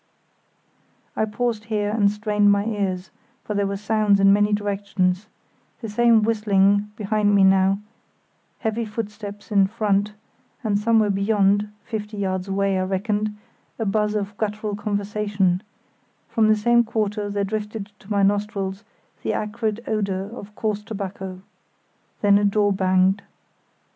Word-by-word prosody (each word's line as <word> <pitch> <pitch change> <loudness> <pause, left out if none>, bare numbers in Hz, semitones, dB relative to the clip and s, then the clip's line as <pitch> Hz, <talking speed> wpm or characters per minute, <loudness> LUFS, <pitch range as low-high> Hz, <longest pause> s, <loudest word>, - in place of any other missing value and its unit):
I 220 - +1
paused 220 0 -2
here 210 -2 -1
and 210 -2 +3
strained 210 0 +2
my 200 0 +2
ears, 195 -4 -2 0.3
for 210 - -4
there 200 -1 +1
were 200 0 -3
sounds 210 0 +2
in 195 0 +6
many 205 +1 +3
directions; 200 -2 0 0.5
the 225 - -6
same 230 0 +4
whistling 205 -2 +2
(behind 205 0 +1
me 195 - +5
now), 190 0 +4 0.8
heavy 220 0 -1
footsteps 210 -1 -7
in 200 -2 +4
front, 210 -1 0 0.5
and 205 -3 +1
somewhere 220 -1 +3
beyond—fifty 210 +1 0
yards 190 -1 -2
away, 195 0 +1
I - - +1
reckoned—a 210 +3 -4
buzz 210 +1 +1
of 205 0 -3
guttural 210 -1 -2
conversation; 205 -2 0 0.7
from 220 -2 +2
the 215 - +5
same 235 +3 +3
quarter 210 -2 -2
there 200 0 -1
drifted 210 0 -4
to 195 - -17
my 200 -2 +2
nostrils 200 0 0 0.4
the - - -1
acrid 215 +1 -2
odour 200 -2 -2
of 210 -2 -10
coarse 210 -2 -2
tobacco. 190 -3 -6 0.8
Then 205 -1 +5
a - - -1
door 205 0 +2
banged. 190 +1 +2
205 Hz, 135 wpm, -23 LUFS, 200-215 Hz, 0.8 s, in